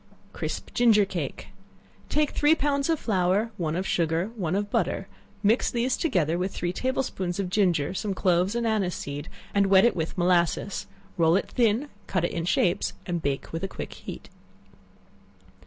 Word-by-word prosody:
Crisp - - -5
Ginger 225 -4 +5
cake. 175 -6 -5 0.6
Take 300 -1 +1
three 300 +2 +4
pounds 280 0 0
of 325 -2 +2
flour, 200 +2 +1
one 160 -3 -1
of 185 +2 -1
sugar, 165 -2 +1
and 225 +5 -8
one 180 -5 -1
of 205 +1 -2
butter; 195 - 0 0.4
mix 220 +4 +3
these 245 +2 0
together 175 - +1
with 185 +1 -1
three 175 0 -2
table 260 +5 0
spoonsful 185 -6 -3
of 180 - -6
ginger, 180 -6 +2
some 195 0 -2
cloves 185 +3 +2
and 235 0 0
anise 210 -5 +1
seed, 145 +2 -6 0.2
and 200 -1 +3
wet 195 +1 +6
it 240 - +3
with 160 +1 -3
molasses; 175 +2 +1 0.3
roll 165 0 +4
it - - -1
thin; 235 +3 +2 0.2
cut 185 -3 0
it - - -2
in 165 -1 -3
shapes, 175 0 +1
and 175 -2 -2
bake 140 +1 -3
with 165 - -3
a - - 0
quick - - -7
heat. - - -9
190 Hz, 180 wpm, -26 LUFS, 175-225 Hz, 0.6 s, wet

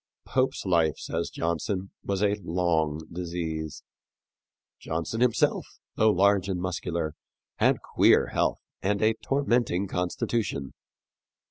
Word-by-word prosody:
Pope's 130 -4 0
life, 85 -4 +2
says 85 +2 -3
Johnson, 90 +4 -2
was 100 0 -1
a 100 0 +3
long 80 -3 0
disease. 85 -3 -4 1.0
Johnson 80 +8 -3
himself, 125 -2 +2 0.3
though 110 - +4
large 100 -1 +3
and 90 -2 -1
muscular, 85 -3 -2 0.4
had - - +2
queer - - +4
health - - +1 0.2
and 100 +1 +1
a 110 +1 +4
tormenting 120 -9 +1
constitution. 90 - -2
90 Hz, 110 wpm, -27 LUFS, 85-100 Hz, 1.0 s, though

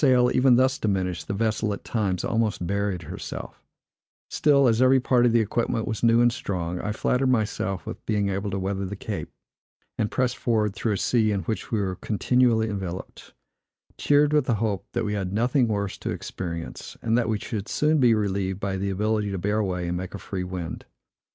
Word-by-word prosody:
With 145 - +5
the 130 - +6
sail 125 0 +4
even 125 -1 +5
thus 130 +1 +3
diminished, 95 -4 -1
the 100 - -2
vessel, 110 0 0
at - - -7
times, 100 -6 -1
almost 110 -5 0
buried 100 -1 -1
herself; - - -7 0.7
still, 140 -3 +4
as 115 0 +3
every 130 +1 +6
part 125 -1 +3
of - - +3
the 115 0 +4
equipment 115 +1 -1
was 110 -3 -3
new 115 0 +5
and 120 0 +4
strong, 90 -6 -3
I 105 - -2
flattered 125 +4 +1
myself 105 -5 -1
with - - -7
being 105 -2 +1
able 100 +1 -2
to 100 - -2
weather 95 +1 -2
the 100 - -5
Cape, - - -5 0.7
and 105 - +1
pressed 125 +1 0
forward 110 -4 +1
through 110 +1 -1
a - - -1
sea 110 -1 +2
in 100 -2 0
which 110 +6 -4
we 110 - +1
were 95 -2 -2
continually 115 +1 +2
enveloped, 95 -3 -6 0.6
cheered 145 +1 +3
with 150 -3 +3
the 120 - +1
hope 100 -3 -2
that - - -1
we 105 - -1
had 95 -3 -2
nothing 120 +4 +2
worse 100 -3 -2
to - - -4
experience, 85 -2 -6
and 115 0 +2
that 120 -2 +1
we 110 - +1
should 105 -1 -5
soon 155 +1 +2
be 120 -4 +5
relieved 95 -2 -1
by 95 -1 -2
the 100 +1 -2
ability 105 +2 0
to 100 - -3
bear 105 +4 0
away 90 -4 -1
and 90 +1 -1
make 95 +2 -6
a - - -4
free 95 -1 -5
wind. 90 -2 -5
105 Hz, 210 wpm, -25 LUFS, 95-120 Hz, 0.7 s, the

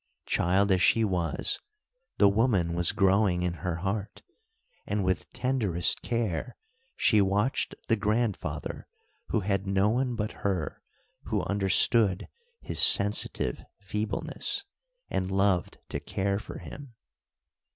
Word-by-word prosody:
Child 95 +3 +2
as 95 -1 +3
she 115 +4 +4
was, 85 -6 -1 0.6
the - - +6
woman 100 -5 +2
was 85 0 +3
growing 95 -3 +2
in 90 -1 -1
her 90 -3 -2
heart, 95 +4 -4 0.6
and 100 -1 -1
with 95 0 -1
tenderest 110 -10 0
care 115 -1 -2 0.4
she 105 - +3
watched 100 +6 0
the 115 - +3
grandfather 105 - -2 0.4
who 110 - 0
had 100 0 -1
no 95 +1 +2
one 125 +2 0
but 105 -2 -2
her 95 -7 -2 0.4
who - - -1
understood 100 0 +2 0.3
his - - -4
sensitive 100 -10 +4
feebleness, 105 +2 -2 0.5
and 95 0 -1
loved 95 -2 +1
to - - -3
care 100 +1 -2
for - - -9
him. 140 -5 -10
100 Hz, 120 wpm, -28 LUFS, 95-110 Hz, 0.6 s, the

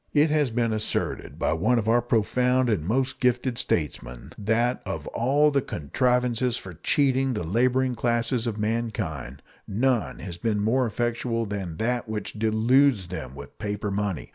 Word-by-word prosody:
It 150 +1 +4
has 150 -3 +2
been 115 -1 0
asserted 110 0 -2
by - - +1
one 110 +10 +2
of 110 -2 -1
our 120 +2 +4
profound 125 +2 +2
and 100 -8 0
most 130 +7 0
gifted 125 -1 +1
statesmen 65 - -2
that 115 +4 0
Of - - -5
all 145 +5 +2
the 140 -1 +2
contrivances 125 - 0
for 95 - -7
cheating 135 - +1
the 105 - -2
laboring 125 +8 +1
classes 120 +1 0
of 110 -2 -2
mankind, 105 - -3 0.2
none 120 +2 0
has 85 -3 -7
been 105 +1 0
more 120 +5 +2
effectual 115 0 -1
than 95 -6 -5
that 120 0 -1
which 105 -2 -4
deludes 110 0 +3
them 70 -7 -6
with 70 -1 -11
paper 105 0 -3
money. 100 -4 -2
115 Hz, 160 wpm, -25 LUFS, 105-125 Hz, 0.2 s, It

